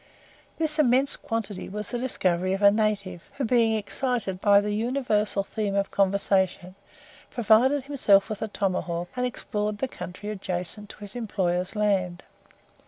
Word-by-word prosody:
This 315 Hz, -1 st, -1 dB
immense 270 Hz, 0 st, +4 dB
quantity 220 Hz, -4 st, -4 dB
was 210 Hz, +1 st, -5 dB
the 240 Hz, -, -2 dB
discovery 185 Hz, -7 st, 0 dB
of 195 Hz, +1 st, -2 dB
a 200 Hz, -, +8 dB
native, 200 Hz, -5 st, -1 dB
who, 275 Hz, -1 st, -2 dB
being 225 Hz, -2 st, +3 dB
excited 215 Hz, -3 st, -2 dB
by 200 Hz, -2 st, +6 dB
the 205 Hz, 0 st, -2 dB
universal 215 Hz, -3 st, 0 dB
theme 205 Hz, 0 st, -3 dB
of 200 Hz, 0 st, 0 dB
conversation, 190 Hz, -2 st, +1 dB, 0.6 s
provided 245 Hz, +5 st, +3 dB
himself 215 Hz, -8 st, +3 dB
with 215 Hz, -, -5 dB
a 220 Hz, -, -1 dB
tomahawk, 180 Hz, -4 st, -2 dB
and 250 Hz, 0 st, 0 dB
explored 210 Hz, -3 st, -3 dB
the 265 Hz, -, -1 dB
country 205 Hz, -3 st, -8 dB
adjacent 190 Hz, 0 st, -4 dB
to -, -, -11 dB
his 205 Hz, +1 st, -7 dB
employer's 185 Hz, -5 st, -1 dB
land. 195 Hz, -4 st, 0 dB
210 Hz, 150 wpm, -26 LUFS, 190-230 Hz, 0.6 s, a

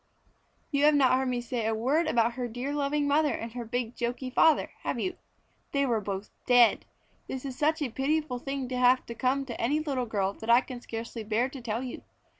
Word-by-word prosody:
You 285 Hz, 0 st, +3 dB
have 300 Hz, 0 st, +6 dB
not 265 Hz, -3 st, +4 dB
heard 260 Hz, +1 st, +2 dB
me 245 Hz, -1 st, -1 dB
say 240 Hz, -2 st, -2 dB
a 220 Hz, -, +1 dB
word 280 Hz, +9 st, +1 dB
about 235 Hz, -5 st, +2 dB
her 250 Hz, 0 st, -3 dB
dear 245 Hz, +5 st, -4 dB
loving 290 Hz, 0 st, 0 dB
mother 290 Hz, -2 st, +2 dB
and 230 Hz, 0 st, -6 dB
her 240 Hz, +1 st, -5 dB
big 240 Hz, 0 st, -3 dB
joky 250 Hz, +2 st, -3 dB
father, 315 Hz, +4 st, +4 dB
have -, -, -2 dB
you? 370 Hz, -1 st, -2 dB, 0.6 s
They 280 Hz, 0 st, +2 dB
were 230 Hz, -4 st, +1 dB
both 195 Hz, 0 st, -5 dB, 0.2 s
dead! 245 Hz, -2 st, +5 dB, 0.4 s
This 265 Hz, +1 st, -5 dB
is 265 Hz, -2 st, -5 dB
such 305 Hz, +2 st, +1 dB
a 255 Hz, -, -3 dB
pitiful 275 Hz, 0 st, -1 dB
thing 275 Hz, 0 st, -4 dB
to 255 Hz, -, -2 dB
have 250 Hz, +1 st, +4 dB, 0.2 s
come 270 Hz, +2 st, +1 dB
to 240 Hz, -3 st, -6 dB
any 280 Hz, +7 st, +2 dB
little 275 Hz, -5 st, -2 dB
girl 200 Hz, -3 st, 0 dB
that 220 Hz, +3 st, -9 dB
I 235 Hz, +2 st, +7 dB
can 250 Hz, -2 st, -8 dB
scarcely 230 Hz, 0 st, -6 dB
bear 225 Hz, +4 st, 0 dB
to 270 Hz, -1 st, -9 dB
tell 230 Hz, +1 st, -3 dB
you. 255 Hz, -, -6 dB
255 Hz, 220 wpm, -28 LUFS, 235-280 Hz, 0.6 s, I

